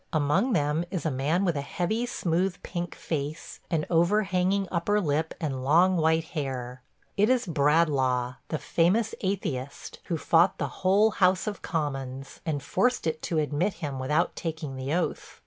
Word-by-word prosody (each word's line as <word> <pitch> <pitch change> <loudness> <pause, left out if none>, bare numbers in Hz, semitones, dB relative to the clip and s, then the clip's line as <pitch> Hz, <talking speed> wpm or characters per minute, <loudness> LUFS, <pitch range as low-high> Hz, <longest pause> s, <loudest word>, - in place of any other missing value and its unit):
Among 155 - +2
them 150 -1 +1
is 185 -3 -4
a 160 - +1
man 150 +9 +1
with 170 -4 +1
a 140 - -1
heavy, 215 +11 -2
smooth, 185 -6 0
pink 175 0 -4
face, 155 0 -4
an 160 -3 0
overhanging 190 +2 +2
upper 190 +4 +1
lip 160 -3 -1
and 135 -5 -3
long 175 +7 +4
white 160 -1 +2
hair. 130 -5 -5 0.4
It 210 +3 +4
is 255 -1 +2
Bradlaugh, 140 -6 +2
the 155 - -2
famous 195 +9 +1
atheist, 140 -9 -3
who 170 - -1
fought 170 +4 +3
the - - -1
whole 200 +4 +4
House 185 -2 +2
of 210 -2 -4
Commons, 135 -4 -4
and 145 -3 -1
forced 245 +4 +1
it 160 -1 -1
to 165 - -2
admit 155 +6 0
him 145 -6 -5
without 150 +6 0
taking 160 -4 -4
the 130 +1 -4
oath. 175 +2 -2
165 Hz, 165 wpm, -27 LUFS, 145-185 Hz, 0.4 s, long